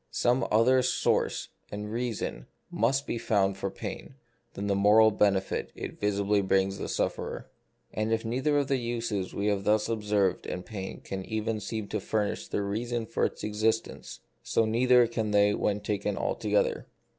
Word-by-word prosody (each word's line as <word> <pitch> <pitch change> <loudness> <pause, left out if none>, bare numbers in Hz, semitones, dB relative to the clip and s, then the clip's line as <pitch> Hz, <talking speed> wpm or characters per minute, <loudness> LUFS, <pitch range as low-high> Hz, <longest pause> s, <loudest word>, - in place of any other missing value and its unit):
Some 120 +1 +1
other 125 +4 +4
source 125 - 0 0.2
and 105 +1 -5
reason 115 - -3 0.2
must 135 +5 +1
be 115 - -3
found 100 -4 +1
for 95 0 -3
pain - - -7 0.4
than 100 - -4
the 100 - +1
moral 105 +3 +6
benefit 100 -2 +1
it - - -7
visibly 100 0 +1
brings 95 0 +1
the - - -4
sufferer. - - -3 0.4
And 110 +1 -1
if 115 0 0
neither 130 +6 +1
of 140 -2 +1
the 135 -2 +1
uses 115 -5 -3
we 100 - -1
have 100 -2 +1
thus 105 +1 +2
observed 105 -4 0
in 90 - -4
pain 95 -3 -7
can 95 -1 -5
even 110 0 -2
seem 110 0 -4
to 105 - -1
furnish 105 +1 -2
the 100 - -2
reason 115 +3 -2
for - - 0
its - - -4
existence, 110 - -2 0.2
so 115 - +1
neither 125 +2 +4
can 115 -2 -2
they 105 0 +4
when 105 0 0
taken 105 -1 -2
altogether. 105 -1 0
105 Hz, 170 wpm, -28 LUFS, 100-115 Hz, 0.4 s, moral